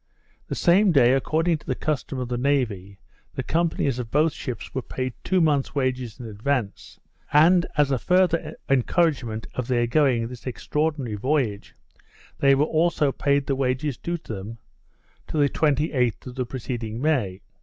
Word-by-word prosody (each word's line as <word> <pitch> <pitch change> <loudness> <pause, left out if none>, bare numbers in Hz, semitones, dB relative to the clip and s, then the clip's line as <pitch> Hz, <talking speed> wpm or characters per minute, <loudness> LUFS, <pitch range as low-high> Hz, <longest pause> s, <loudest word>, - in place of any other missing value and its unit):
The - - -3
same 190 +3 +4
day, 130 -5 +5
according 160 +4 +1
to - - -21
the - - 0
custom 145 -3 -3
of 125 -1 -3
the 120 - -2
navy, 110 -8 -1 0.4
the - - -2
companies 160 -6 0
of 120 -2 -5
both 150 +3 +2
ships 120 -6 -6
were 130 - -2
paid 130 0 -4
two 190 0 +2
months 150 -4 +1
wages 130 -4 -2
in 120 - -7
advance, 110 +1 -3 0.3
and, 170 +4 +5
as 145 -2 +3
a 130 - +1
further 170 -3 +1
encouragement 135 -4 +1
for - - -2
their 120 -1 0
going 120 -2 +2
this 125 +1 -10
extraordinary 140 -2 -2
voyage, 125 -4 -1 0.6
they 140 0 +5
were 145 +2 +3
also 155 -2 +1
paid 140 0 +1
the 135 - 0
wages 130 +1 -1
due 170 +8 -3
to 155 -8 -8
them 105 +3 -7 0.7
to - - -4
the 145 -1 +4
28th 140 -6 0
of 125 - -7
the 125 -1 -3
preceding 115 -2 -5
May. 125 -11 0
135 Hz, 165 wpm, -24 LUFS, 120-155 Hz, 0.7 s, day